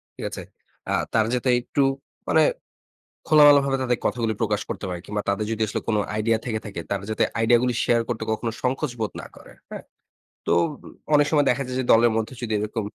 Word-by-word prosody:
ঠিক - - -6
আছে? - - -7 0.5
আ - - +1 0.2
তারা 110 -1 +3
যাতে 125 +1 -1
একটু 140 +3 0 0.4
মানে - - +4 0.9
খোলামেলাভাবে 145 -3 +6
তাদের 125 -2 0
কথাগুলি 115 -2 -1
প্রকাশ 105 -2 0
করতে - - -5
পারে। 90 -1 -4
কিংবা 105 0 -3
তাদের 105 +2 -1
যদি 110 0 -2
আসলে 105 - -3
কোন 110 - +2 0.2
আইডিয়া 110 +1 +1
থেকে 110 -3 -1
থাকে, 100 -5 -6
তারা 100 -1 -2
যাতে 110 - +1 0.2
আইডিয়াগুলি 120 +2 +3
শেয়ার 120 -1 +3
করতে 120 -2 -3
কখনো 115 +1 -2
সংকোচ 135 +3 -1
বোধ 110 - -2
না - - -9
করে। - - -15 0.2
হ্যাঁ? - - -8 0.6
তো - - +3 0.6
অনেক 145 0 +5
উম - - -4
সময় 145 -2 +3
দেখা 125 +3 +1
যায় 130 0 -4
যে 130 - -1
দলের 115 +1 +5
মধ্যে 115 +3 -3
যদি 115 -3 -3
এরকম 105 +1 -3
115 Hz, 200 wpm, -24 LUFS, 110-130 Hz, 0.9 s, খোলামেলাভাবে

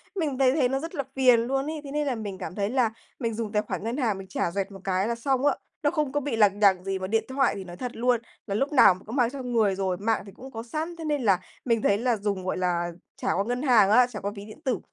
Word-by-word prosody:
Mình 305 -8 -1
thấy 260 -1 +4
thấy 265 -5 +3
nó 270 +1 0
rất 330 +3 -6
là 280 - -1
phiền 255 -3 +6
luôn 270 +4 -1
ấy, 310 -1 -4
thế 280 - -8
nên 295 0 -1
là 260 - 0
mình 205 -4 -5
cảm 185 - -6
thấy 200 -1 -1
là 250 -2 +2 0.3
mình 230 -4 -1
dùng 220 -1 -3
tài 210 -1 +2
khoản - - -5
ngân 230 +4 -2
hàng 225 -8 0
mình 195 0 -9
trả 185 -2 -1
rẹt 195 +2 -2
một 195 - -10
cái 190 +1 0
là 235 - -1
xong 265 +3 0
á, 290 - +4 0.3
nó 290 - +3
không 305 -5 -1
có 290 - +1
bị 285 -4 -2
lằng 205 -2 +3
nhằng 190 -3 +4
gì 195 0 -2
mà 185 - -3
điện 225 +2 +1
thoại 270 0 +2
thì 195 - -6
nói 175 -1 -10
thật 250 +4 -4
luôn 245 0 +2 0.3
là 200 - -2
lúc 275 +7 0
nào 255 -8 +8
mình 185 - -13
cũng 225 - -6
mang 245 -4 +3
trong 255 -2 -6
người 210 -4 +3
rồi, 190 -2 -1
mạng 220 +3 0
thì 200 - -11
cũng 265 +6 -12
có 225 -1 -6
sẵn, 310 +8 -4
thế 330 -1 -7
nên 295 -2 0
là 195 -5 +4 0.3
mình 230 -3 +2
thấy 200 - +3
là 240 +2 +1
dùng, 200 -2 -2
gọi 185 - -1
là, 175 -1 0 0.3
trả - - +1
qua 195 - +1
ngân 245 +2 -2
hàng 240 -8 +5
á, 245 +3 +6
trả 230 -4 -7
qua 200 - -3
ví 200 0 -8
điện 215 +7 -12
tử, 260 -5 -1
230 Hz, 310 wpm, -26 LUFS, 200-265 Hz, 0.3 s, nào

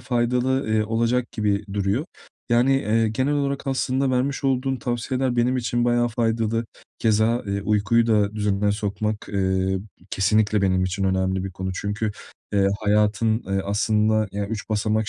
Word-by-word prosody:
faydalı, 125 +1 0
iii, 110 0 +2
olacak 115 +2 0
gibi 105 -2 0
duruyor. 100 +8 0 0.5
Yani, 120 +3 +4
eee, 115 -3 +1
genel 130 +6 0
olarak 140 -1 -2
aslında 130 0 0
vermiş 135 +2 -1
olduğun 135 0 +1
tavsiyeler 125 +1 -2
benim 125 +2 +2
için 120 0 0
bayağı 120 0 +2
faydalı. 115 -1 0 0.3
Keza, 110 +2 +2
eee, 100 0 -2
uykuyu 110 +3 +2
da 105 -2 +2
düzenine 105 -1 +1
sokmak, 105 0 -3
eee, 95 -1 0 0.3
kesinlikle 105 +1 +2
benim 95 -1 +2
için 95 +1 -2
önemli 95 0 0
bir 95 - -4
konu 95 0 -4
çünkü, 105 +3 -2 0.4
eee, 100 -1 +3
hayatın, 105 +1 +2
eee, 95 0 0
aslında 110 +1 +1
ya 100 0 -2
3 110 -3 -5
basamak 110 0 0
110 Hz, 150 wpm, -23 LUFS, 100-120 Hz, 0.5 s, Yani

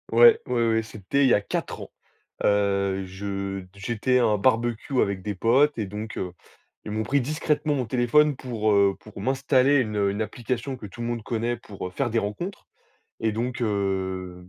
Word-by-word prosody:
Ouais, 470 -2 +7
ouais, 115 -1 +1
ouais, 115 0 +2
c'était 110 +5 -1
il 135 - +5
y - - +5
a - - +5
4 - - -4
ans, - - -9 0.5
heu, 100 -1 +1
je 100 +1 -4
d 90 - -15
j'étais 120 +5 0
à 120 - +3
un 105 -2 +2
barbecue 120 +3 +1
avec 100 -1 0
des 105 +2 -4
potes 130 +9 +3
et 110 - -1
donc 105 +3 -6
heu, 90 -1 -4 0.5
ils 105 - -6
m'ont 110 +1 -1
pris 140 +4 +1
discrètement 150 +2 0
mon 130 -3 -1
téléphone 130 +6 +3
pour, 115 -5 -1
heu, 100 -1 +4
pour 105 -2 -11
m'installer 135 +3 +3
une 110 -4 -1
une 100 +2 -2
application 120 +5 -3
que 120 - -10
tout 100 - -14
le 115 - -2
monde 120 -2 -3
connaît 120 +1 -1
pour, 100 -5 -7
heu, - - -10
faire 125 +7 -1
des 115 0 +1
rencontres 115 - -5 0.5
et 110 -1 +1
donc 120 +4 -3
heu, 95 -4 -2
110 Hz, 200 wpm, -25 LUFS, 100-125 Hz, 0.5 s, Ouais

